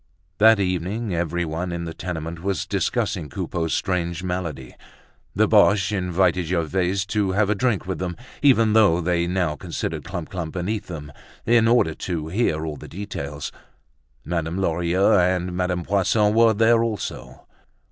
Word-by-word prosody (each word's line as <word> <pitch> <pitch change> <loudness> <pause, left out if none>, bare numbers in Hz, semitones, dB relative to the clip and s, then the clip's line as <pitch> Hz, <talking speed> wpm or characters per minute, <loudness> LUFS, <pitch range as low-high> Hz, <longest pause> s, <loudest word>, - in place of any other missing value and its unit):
That 110 0 +6
evening 95 +3 -1
everyone 85 0 -2
in 85 0 -4
the 80 - -5
tenement 85 -1 -5
was 95 -4 -1
discussing 75 - -1
Coupeau's 80 +4 -2
strange 85 -3 -2
malady. 85 -8 -4 0.6
The - - +3
Boches 95 0 +4
invited 90 -2 +1
Gervaise 90 +3 0
to 100 -2 0
have 105 +1 +2
a - - +4
drink 110 -1 0
with 95 0 -4
them, 90 -1 -4 0.2
even 115 -6 +4
though 105 -6 +5
they 85 0 0
now 90 -4 0
considered - - -4
Clump 85 -3 -6
clump 85 -4 -4
beneath 100 +4 -3
them, 75 -4 -7 0.3
in 115 -1 +4
order 115 -9 +3
to 80 -2 -4
hear 80 -5 0
all 75 -2 -5
the - - -10
details. 75 -7 -6 0.7
Madame 85 0 -2
Lorilleux 90 +2 +2
and 90 0 +1
Madame 90 -1 -1
Poisson 100 +3 +2
were 115 -1 +5
there 115 +2 +4
also. 110 -3 -5
90 Hz, 150 wpm, -23 LUFS, 85-100 Hz, 0.7 s, That